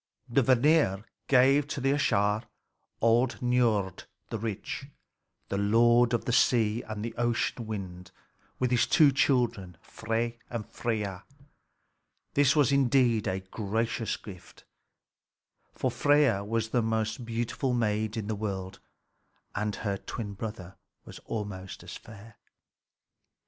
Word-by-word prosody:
The 120 +3 +2
Vanir 125 -5 +3 0.2
gave 135 +2 +4
to 140 - -4
the 135 +1 +1
Æsir 105 -6 +1 0.6
old 120 +3 +3
Niörd 115 -6 +1 0.3
the 115 - -3
rich, 110 +5 -5 0.6
the 100 - -1
lord 120 +3 +4
of - - -3
the - - 0
sea 115 -2 +3
and 110 0 -5
the 115 - -5
ocean 120 -1 -1
wind, 95 -4 -6 0.5
with 125 -1 0
his 120 - +3
two 150 -4 +5
children, 120 - +1
Frey 115 +1 -3
and 115 -3 -4
Freia. 105 -7 -3 1.1
This 140 0 +4
was 145 -3 +4
indeed 125 -5 +3
a 95 +1 -1
gracious 110 +4 -2
gift; 95 -5 -13 1.1
for - - -1
Freia 145 -9 +3
was 110 +1 -2
the 120 +1 +1
most 110 +1 -1
beautiful 120 +3 -2
maid 110 -1 0
in 110 - -3
the 110 - -2
world, 95 -3 -4 0.7
and 105 0 -2
her 100 -3 -2
twin 105 0 -6
brother 100 -3 -7 0.3
was - - -10
almost 100 -4 -6
as - - -8
fair. 110 0 -13
115 Hz, 130 wpm, -28 LUFS, 105-125 Hz, 1.1 s, two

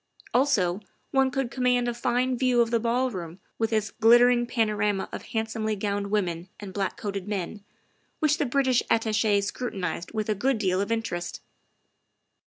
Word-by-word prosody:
Also, 205 -9 +2 0.3
one 270 -1 +3
could 260 -2 -2
command 250 0 +1
a 240 - 0
fine 245 +1 0
view 250 -1 +2
of 230 -1 +3
the 230 - +3
ballroom 230 -8 -2 0.2
with 225 0 0
its 215 -1 0
glittering 240 +2 +5
panorama 210 -4 0
of - - -5
handsomely 220 -1 -2
gowned 200 0 -2
women 180 -4 -1
and 200 -2 -8
black 195 -1 -2
coated 200 -2 -4
men, 200 0 -4 0.5
which 310 +1 +2
the 295 - +2
British 260 -1 +2
Attache 220 -2 +2
scrutinized 200 -5 -4
with 215 -2 -2
a 215 - +2
good 250 +5 +1
deal 190 -3 +1
of 200 +3 -2
interest. 220 -7 -3
220 Hz, 160 wpm, -26 LUFS, 200-245 Hz, 0.5 s, glittering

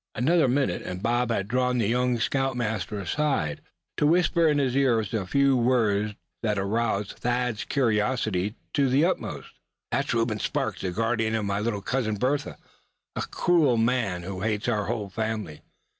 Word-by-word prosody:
Another 155 +4 +3
minute, 125 -8 +1
and 90 +2 -6
Bob 120 +1 +1
had 100 -4 -1
drawn 125 +2 +1
the 115 -4 +1
young 125 +1 +1
scoutmaster 115 -5 -1
aside, 100 - -1 0.4
to 150 - +3
whisper 170 0 +3
in 150 -1 +3
his 135 -3 +1
ear 130 -4 +3
a 105 -2 -3
few 140 +5 +3
words 110 -4 +2 0.3
that 105 -3 0
aroused 105 0 0
Thad's 125 -2 -1
curiosity 110 -5 0 0.2
to 140 -2 +2
the 140 +5 +4
utmost. 185 - -3 0.3
"That - - +1
is - - 0
Reuben 115 -2 0
Sparks, - - -2
the 95 - -1
guardian 115 +3 0
of 110 -2 -1
my 100 0 -1
little 105 -2 -2
cousin 115 -4 -1
Bertha, 135 +7 -1 0.6
a - - -2
cruel 155 -9 +2
man, 115 -6 0
who 95 0 -5
hates 110 +1 -1
our 105 -4 0
whole 105 -2 -3
family. 110 -7 -3
115 Hz, 165 wpm, -26 LUFS, 105-130 Hz, 0.6 s, the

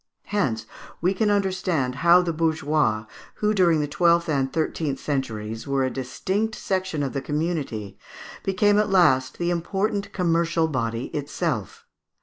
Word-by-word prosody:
Hence 115 - 0 0.3
we 180 +3 +2
can 210 +2 +1
understand 185 -10 0
how 175 +2 +6
the 170 -2 -1
bourgeois, 150 -8 +1 0.3
who 210 0 +1
during 170 -6 +3
the 145 - -1
twelfth 170 +1 +2
and 135 -3 0
thirteenth 155 -3 -1
centuries 115 -5 -3
were 135 -1 +1
a 130 - 0
distinct 190 - -2
section 185 -6 -2
of 135 - -3
the 135 - -2
community, 145 - -3 0.4
became 205 +2 +3
at 210 0 +1
last 170 -9 +3
the 175 0 0
important 200 +4 -1
commercial 170 -2 +1
body 115 -4 -3
itself. 145 -1 -3
165 Hz, 140 wpm, -24 LUFS, 135-185 Hz, 0.4 s, how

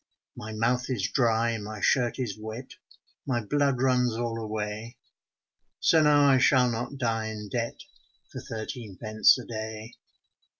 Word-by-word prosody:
My 110 - -7
mouth 120 +4 0
is 100 -6 -1
dry, 115 -2 +2
my 105 +1 -7
shirt 120 +2 +2
is 120 -7 -3
wet, 110 +4 -8 0.6
My 125 -3 +1
blood 140 +1 +1
runs 125 -3 +2
all 115 -1 -2
away, 110 +2 -5 0.8
So 160 - +4
now 145 -1 +5
I 135 -2 +5
shall 125 -1 +4
not 120 +5 -4
die 115 -3 -1
in 105 -1 -6
debt 115 0 -3 0.5
For 130 - -7
thirteen 110 -4 -7
pence 110 +1 +4
a 125 - -8
day. 110 0 -6
115 Hz, 145 wpm, -27 LUFS, 110-125 Hz, 0.8 s, now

